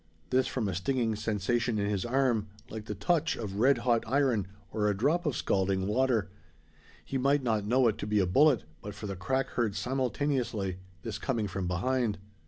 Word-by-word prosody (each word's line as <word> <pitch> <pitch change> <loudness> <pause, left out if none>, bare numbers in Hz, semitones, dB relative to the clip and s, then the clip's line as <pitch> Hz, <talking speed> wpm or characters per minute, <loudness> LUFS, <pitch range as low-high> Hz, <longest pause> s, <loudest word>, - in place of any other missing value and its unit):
This, 130 0 +3
from 120 -5 -1
a 95 - -2
stinging 115 +4 0
sensation 110 +2 0
in 100 -1 0
his 100 -3 -1
arm, 120 -4 +1 0.2
like 110 -1 -6
the 105 - -4
touch 160 - +1
of 100 -3 -5
red 135 +3 +5
hot 120 -2 +3
iron, 125 -6 +2 0.2
or 105 -1 +1
a 100 - 0
drop 160 - +1
of 145 - 0
scalding 95 -1 +1
water. 110 -3 +1 0.7
He 135 - -2
might 140 +2 +2
not 110 -4 0
know 125 +2 +4
it 110 - 0
to - - -4
be 105 0 +1
a 95 - +3
bullet, 135 - +4 0.2
but 105 0 -7
for 105 - -7
the 100 -1 -4
crack 130 +9 -1
heard 110 -5 -1
simultaneously 125 -7 -1 0.3
this 110 -3 -4
coming 115 -6 -1
from 95 -1 -3
behind. 115 +4 0
115 Hz, 190 wpm, -30 LUFS, 100-130 Hz, 0.7 s, red